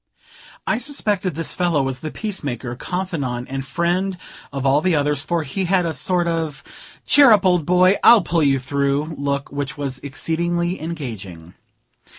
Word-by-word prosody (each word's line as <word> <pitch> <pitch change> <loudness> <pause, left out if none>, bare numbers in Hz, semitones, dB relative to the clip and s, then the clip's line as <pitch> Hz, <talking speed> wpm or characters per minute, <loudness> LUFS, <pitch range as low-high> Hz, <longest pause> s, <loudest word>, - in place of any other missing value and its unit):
I 225 - 0
suspected 210 - -1
this 165 0 -3
fellow 170 -6 +1
was 135 -1 -3
the 155 - -5
peacemaker, 145 - -4
confidant 140 -7 -3
and 135 0 -3
friend 175 +7 -1 0.3
of 135 -1 -4
all 140 +2 +4
the 180 0 +2
others, 145 -1 0
for 170 0 -1
he 185 +8 -3
had 180 0 +2
a 165 - -1
sort 180 0 0
of 160 -4 -2 0.4
"Cheer 285 -4 +6
up, 210 -3 +5
old 180 -5 +2
boy, 185 +2 +4
I'll 235 -5 +8
pull 170 -1 0
you 140 -2 +3
through" 140 +3 -1
look, 140 -1 -3
which 140 -1 -4
was 135 -3 -3
exceedingly 170 +6 -2
engaging. 110 - -7
160 Hz, 165 wpm, -21 LUFS, 140-180 Hz, 0.4 s, I'll